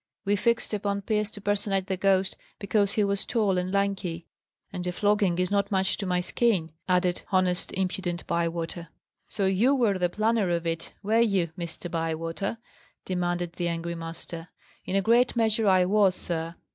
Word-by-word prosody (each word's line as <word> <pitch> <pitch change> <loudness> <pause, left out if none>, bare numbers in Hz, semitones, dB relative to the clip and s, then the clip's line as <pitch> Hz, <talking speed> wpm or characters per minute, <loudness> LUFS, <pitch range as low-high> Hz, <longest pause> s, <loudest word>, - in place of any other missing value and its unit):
We 200 +1 +3
fixed 235 +2 +1
upon 200 -1 -1
Pierce 210 0 0
to 205 - -9
personate 200 -1 0
the 190 -1 -1
ghost 190 0 +2 0.2
because 200 0 +1
he 210 - +2
was 200 -1 0
tall 205 -6 +1
and 180 +1 -3
lanky. 195 -4 -1 0.5
And 180 0 -4
a - - 0
flogging 205 -1 +2
is 180 +1 0
not 200 -1 +1
much 190 -1 +1
to 200 - -4
my 180 0 +1
skin," 185 -4 +1 0.2
added 180 -1 +2
honest, 185 -2 +2
impudent 185 -2 -2
Bywater. 170 0 -2 0.4
"So 200 - -1
you 210 +9 +3
were 215 -7 +2
the 180 -1 +2
planner 215 0 +1
of 170 -1 0
it, 165 0 -3
were 220 +3 +2
you, 195 -8 +2
Mr. 170 0 -6
Bywater?" 165 +5 -2 0.5
demanded 175 -1 -1
the 175 - 0
angry 170 0 -2
master. 165 0 -7 0.4
"In 185 - -2
a 195 - +3
great 240 +4 +4
measure 225 -2 +2
I 185 -2 +5
was, 195 -1 +3
sir. 165 -1 -3
190 Hz, 175 wpm, -27 LUFS, 175-205 Hz, 0.5 s, I